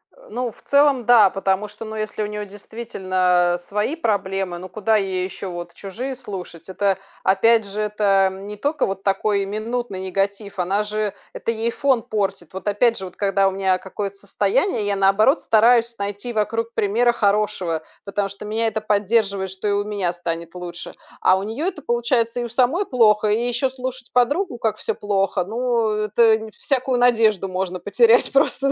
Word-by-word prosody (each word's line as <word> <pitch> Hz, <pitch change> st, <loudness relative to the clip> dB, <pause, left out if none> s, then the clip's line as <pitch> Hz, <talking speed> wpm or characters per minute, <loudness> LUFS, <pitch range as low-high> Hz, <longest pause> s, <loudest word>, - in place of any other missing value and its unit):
Э, -, -, -19 dB
ну, 250 Hz, -, -3 dB
в -, -, -22 dB
целом, 280 Hz, -4 st, +3 dB
да. 225 Hz, -5 st, +7 dB
Потому 195 Hz, +2 st, -1 dB
что, 210 Hz, +2 st, -10 dB
ну, 220 Hz, 0 st, -7 dB
если 215 Hz, 0 st, -3 dB
у -, -, -1 dB
неё 210 Hz, 0 st, -5 dB
действительно, 185 Hz, -4 st, 0 dB
э, -, -, -3 dB
свои 210 Hz, -, -2 dB
проблемы, 195 Hz, -, -1 dB
ну, 185 Hz, +1 st, -9 dB
куда 215 Hz, +3 st, +1 dB
ей 190 Hz, -3 st, 0 dB
ещё 190 Hz, 0 st, -6 dB
вот 175 Hz, 0 st, -7 dB
чужие 240 Hz, +9 st, -6 dB
слушать? 190 Hz, -8 st, -8 dB
Это, 195 Hz, 0 st, 0 dB, 0.3 s
опять 220 Hz, +3 st, +4 dB
же, 200 Hz, +2 st, -4 dB
это, 200 Hz, -2 st, +2 dB
м, 190 Hz, +1 st, -9 dB
не 210 Hz, 0 st, -6 dB
тока 290 Hz, +6 st, 0 dB
вот 195 Hz, 0 st, -4 dB
такой 200 Hz, 0 st, +1 dB
минутный 215 Hz, 0 st, -4 dB
негатив, 195 Hz, +1 st, -3 dB
она 195 Hz, +4 st, +1 dB
же 210 Hz, -1 st, -2 dB, 0.2 s
это -, -, -2 dB
ей 230 Hz, +1 st, -1 dB
фон 265 Hz, -4 st, +1 dB
портит. 195 Hz, -5 st, -3 dB
Вот, 190 Hz, +2 st, -7 dB
опять 230 Hz, +3 st, +2 dB
же, 190 Hz, -, -6 dB
вот 180 Hz, -, -10 dB
когда 195 Hz, -1 st, +2 dB
у -, -, +1 dB
меня, 190 Hz, -1 st, +1 dB
э, -, -, -5 dB
какое-то 195 Hz, +1 st, -5 dB
состояние, 205 Hz, -, 0 dB
я 200 Hz, -1 st, 0 dB
наоборот 195 Hz, +9 st, +4 dB
стараюсь 230 Hz, +1 st, +3 dB
найти 205 Hz, +4 st, -4 dB
вокруг 225 Hz, +2 st, -1 dB
примера 235 Hz, +4 st, +2 dB
хорошего, 200 Hz, -7 st, 0 dB, 0.2 s
потому 200 Hz, 0 st, -2 dB
что 200 Hz, +1 st, -9 dB
меня 225 Hz, +2 st, 0 dB
это 220 Hz, 0 st, -2 dB
поддерживает, 200 Hz, -2 st, +1 dB
что 190 Hz, +2 st, -5 dB
и 205 Hz, -, +2 dB
у 205 Hz, 0 st, +1 dB
меня 200 Hz, -4 st, -1 dB
станет 170 Hz, 0 st, -5 dB
лучше. 175 Hz, -1 st, -7 dB, 0.3 s
А 185 Hz, -, +5 dB
у 195 Hz, -, -3 dB
неё 225 Hz, +10 st, -3 dB
это 340 Hz, -6 st, -4 dB
получается: 235 Hz, -1 st, 0 dB
и 240 Hz, -, -1 dB
у 235 Hz, -, -5 dB
самой 265 Hz, -, +2 dB
плохо, 215 Hz, -6 st, +3 dB
и 230 Hz, +4 st, +1 dB
ещё 245 Hz, +2 st, 0 dB
слушать 255 Hz, -1 st, -7 dB
подругу, 285 Hz, +4 st, +1 dB
как 220 Hz, -2 st, -1 dB
всё 220 Hz, -, -2 dB
плохо. 195 Hz, -2 st, 0 dB
Ну, 235 Hz, +1 st, 0 dB
это, 215 Hz, +1 st, +3 dB
нь 220 Hz, 0 st, -9 dB
всякую 255 Hz, +1 st, -1 dB
надежду 220 Hz, -5 st, +3 dB
можно 185 Hz, 0 st, -3 dB
потерять 230 Hz, +5 st, +4 dB
просто, 275 Hz, 0 st, +2 dB
210 Hz, 190 wpm, -21 LUFS, 195-235 Hz, 0.3 s, да